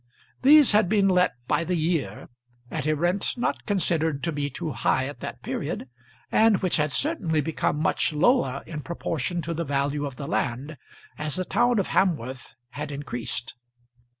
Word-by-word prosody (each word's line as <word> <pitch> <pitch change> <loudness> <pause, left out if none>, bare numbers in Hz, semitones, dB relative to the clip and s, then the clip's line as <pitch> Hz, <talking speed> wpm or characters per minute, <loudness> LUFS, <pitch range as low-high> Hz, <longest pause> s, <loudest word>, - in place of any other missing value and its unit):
These 295 +1 +7
had 210 -4 +4
been 205 -2 +3
let 180 -1 +3
by 170 - +1
the 180 +2 -1
year, 155 - -1 0.4
at 155 -2 -3
a 155 - +2
rent 175 +6 0
not 240 - -2
considered 160 -7 +1
to 170 - 0
be 145 -2 -2
too 155 +3 -4
high 130 -1 +1
at 145 - -8
that - - -7
period, - - -4 0.4
and 220 -2 +5
which 185 - +2
had 150 -1 +1
certainly 195 - 0
become 150 0 -1
much 160 - +1
lower 150 - +2
in 155 -3 -6
proportion 170 +1 -3
to 170 +2 -2
the 165 +1 -2
value 145 0 -1
of 135 - -8
the 140 - -6
land, 135 +4 -2 0.4
as 150 -1 -2
the 185 - -2
town 240 +3 +2
of 195 - 0
Hamworth 130 -10 -1
had 145 +4 -6
increased. 130 -3 -4
160 Hz, 175 wpm, -25 LUFS, 145-185 Hz, 0.4 s, These